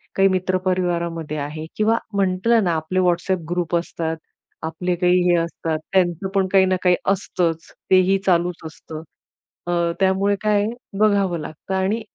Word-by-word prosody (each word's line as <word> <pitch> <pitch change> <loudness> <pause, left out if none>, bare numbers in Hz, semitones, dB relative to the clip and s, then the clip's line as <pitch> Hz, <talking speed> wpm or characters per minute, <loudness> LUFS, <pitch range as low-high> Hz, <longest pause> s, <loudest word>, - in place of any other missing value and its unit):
काही 195 0 +5
मित्र 185 0 0
परिवारामध्ये 170 -4 -1
आहे 150 +2 -5
किंवा 220 +2 +2 0.2
म्हटलं 200 +4 +2
ना 175 - +1
आपले 160 +4 -1
WhatsApp 180 +1 +1
ग्रुप 175 -1 -1
असतात, 165 -1 -2 0.5
आपले 175 +3 -2
काही 180 +1 +3
हे 175 - +5
असतात, 165 -1 -2
त्यांचं 180 0 +1
पण 195 -1 +2
काही 190 -1 +5
ना 185 0 +1
काही 180 -1 +5 0.2
असतच, 175 -4 -1 0.2
तेही 185 +1 +5
चालूच 175 -1 +1
असतं. 155 0 -9 0.7
अ, - - -1 0.3
त्यामुळे 195 +1 +2
काय 210 -1 +2 0.3
बघावं 200 -5 +2
लागतं 155 +4 -7
आणि 195 +4 0
180 Hz, 150 wpm, -21 LUFS, 170-190 Hz, 0.7 s, काही